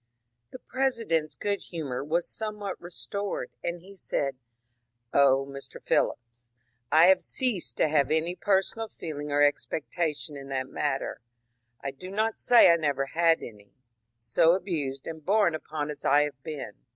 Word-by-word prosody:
The - - -9
President's 225 - -1
good 205 -1 -2
humour 140 -7 -4
was 165 +4 0
somewhat 210 -2 -4
restored, 200 +3 -4
and 170 0 -3
he 195 +3 -14
said: 140 -6 -2
^^ - - -37 0.8
Oh, 135 -1 +5
Mr. 140 0 -5
Phillips, 120 0 -1 0.4
I 160 +3 +7
have 190 +1 +6
ceased 195 - -1
to - - +3
have 145 -3 +2
any 160 +3 +1
personal 205 +3 0
feeling 150 -6 -6
or 145 0 +4
expectation 150 +1 -1
in 140 -1 -8
that 130 -1 -2
matter, 135 -3 -2 0.3
— 115 0 -43
I 135 - -2
do 185 +8 -10
not 215 +3 -1
say 240 -7 +7
I 170 - +4
never 145 -4 0
had 165 +3 +2
any, 100 -3 -12 0.3
— 115 +1 -52
so 120 +8 +3
abused 155 -8 -3
and 160 -1 -7
borne 200 -1 +3
upon 150 -1 -4
as 145 -1 -9
I 145 +1 +5
have 140 -3 -5
been." 145 -8 -6
155 Hz, 165 wpm, -28 LUFS, 135-185 Hz, 0.8 s, I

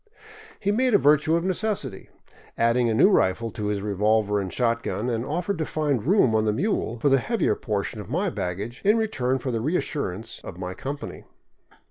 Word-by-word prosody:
He 200 - 0
made 250 +1 +2
a - - +9
virtue 150 0 +4
of 170 - 0
necessity, 190 - -2 0.5
added 115 +1 +3
a 115 - +1
new 190 - +6
rifle 115 - +2
to 105 0 -4
his 105 -1 -2
revolver 105 0 +1
and 95 -2 -5
shot 115 -2 0
gun, 120 +2 -2
and 115 0 -1
offered 175 +6 -2
to 160 - 0
find 145 -7 0
room 185 - +4
on 110 0 +2
the 105 - +2
mule 120 - -1
for 145 - +1
the 135 0 +4
heavier 230 - +1
portion 105 0 -3
of 105 - -11
my 180 +7 0
baggage 100 - -4
in 210 +3 +4
return 135 - 0
for 130 0 -3
the 115 -2 -1
reassurance 115 - -2
of 90 - -8
my 90 0 -5
company. 140 +8 -6
125 Hz, 195 wpm, -25 LUFS, 110-170 Hz, 0.5 s, a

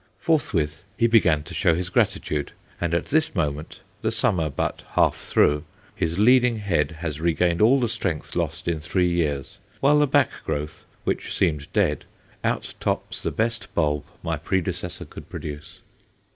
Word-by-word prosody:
Forthwith 85 - 0
he 115 - +3
began 100 -10 +4
to - - -10
show 85 - +3
his 90 +1 -2
gratitude, 75 -4 0 0.3
and 85 -1 0
at 85 - 0
this 155 -2 +1
moment 75 -3 -2 0.2
the - - +1
summer 80 -4 +1
but 70 - -2
half - - +4
through 75 0 +2 0.3
his 85 +1 -1
leading 125 +2 +5
head 85 -8 +1
has 80 -3 -3
regained 85 +1 +2
all 125 +6 +6
the 120 - +1
strength 105 -8 -3
lost - - -2
in 85 -2 0
three 90 +4 +1
years, 80 +1 -1 0.2
while 150 +2 +5
the 150 - +4
back 140 -2 +3
growth, 75 +2 -4 0.2
which - - -2
seemed 75 -6 0
dead, - - +1 0.4
outtops - - -2
the - - -1
best 115 0 -2
bulb 75 -3 +1 0.2
my 80 -2 -1
predecessor 90 +1 -2
could - - -11
produce. 75 +5 -7
85 Hz, 160 wpm, -24 LUFS, 75-110 Hz, 0.4 s, all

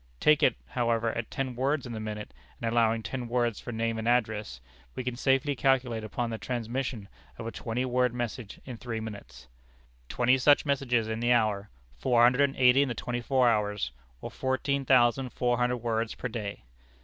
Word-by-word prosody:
Take 150 -1 +4
it, 125 - +4
however, 115 -2 0
at 115 -1 -4
ten 130 -2 -3
words 135 +3 0
in 120 - -6
the 110 - -4
minute, 105 -1 -6 0.3
and 115 - -2
allowing 115 -1 +2
ten 125 0 -4
words 120 -2 0
for 120 - -7
name 115 0 -1
and 110 - -3
address, 110 - 0 0.4
we - - -3
can 125 -1 -3
safely 135 +2 +1
calculate 130 -4 +1
upon 120 +2 -3
the 110 - -4
transmission 120 -1 -3 0.3
of 115 - -7
a 115 - -3
twenty 120 +3 -3
word 125 0 +2
message 120 -2 -5
in 125 -3 -7
three 115 -1 -4
minutes; 100 - -9 0.6
"Twenty 125 +2 +3
such 145 +4 +5
messages 125 -5 +1
in 110 0 -3
the 120 +1 +1
hour; 105 -4 +2 0.3
"Four 120 -2 +3
hundred 125 +3 +5
and 135 - -10
eighty 125 +1 +5
in 140 - +2
the 120 - -3
twenty 120 0 -3
four 130 +1 +2
hours, 105 - 0 0.3
or - - -6
fourteen 135 +1 -1
thousand 125 0 +3
four 120 -1 +1
hundred 125 0 +1
words 115 -1 -2
per - - -4
day. 105 -4 -5
120 Hz, 195 wpm, -28 LUFS, 110-130 Hz, 0.6 s, such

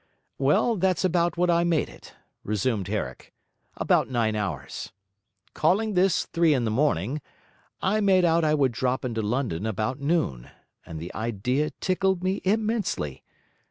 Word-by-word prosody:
'Well, 150 - +3
that's 185 0 +1
about 175 -1 +1
what 175 0 +3
I 170 0 +3
made 170 -3 +1
it,' - - -15 0.3
resumed 105 -1 -1
Herrick, 105 +1 -5 0.4
'about - - +2
nine 115 -4 0
hours. 100 -9 -4 0.6
Calling 205 +7 +2
this 185 0 +2
three 165 -3 +2
in 125 -3 0
the 110 - 0
morning, 135 - 0 0.6
I 210 +3 +2
made 190 -3 +4
out 165 0 +3
I 155 -1 +3
would 135 -4 +2
drop 125 +2 -1
into 115 -3 -2
London 110 -4 -1
about 110 +6 -2
noon; 140 - -1 0.4
and 80 -1 -6
the 85 +3 -7
idea 120 +7 -1
tickled 190 -1 0
me 190 +1 0
immensely. 210 - -1
145 Hz, 150 wpm, -26 LUFS, 110-180 Hz, 0.6 s, made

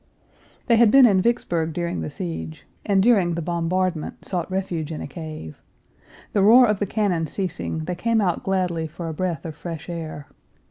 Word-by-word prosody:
They 235 -2 +4
had 235 -1 +6
been 270 +3 +8
in 195 -5 +4
Vicksburg 170 -8 0
during 170 - -2
the 80 - -4
siege, 80 -2 -6 0.2
and 195 -2 +2
during 195 -7 +3
the 170 - -2
bombardment 170 0 -2
sought 175 -3 -3
refuge 180 -4 -3
in 155 - -5
a - - -5
cave. 155 - -8 0.7
The 205 - +3
roar 235 +6 +8
of 210 -3 +1
the 205 - -1
cannon 185 -6 0
ceasing, 160 -2 -3
they 180 - -2
came 225 +6 +1
out 185 -5 0
gladly 180 -4 -1
for 165 +2 -7
a 160 - -3
breath 175 -2 -3
of 160 -2 -6
fresh 165 +1 -7
air. 160 -4 -6
175 Hz, 185 wpm, -23 LUFS, 160-195 Hz, 0.7 s, been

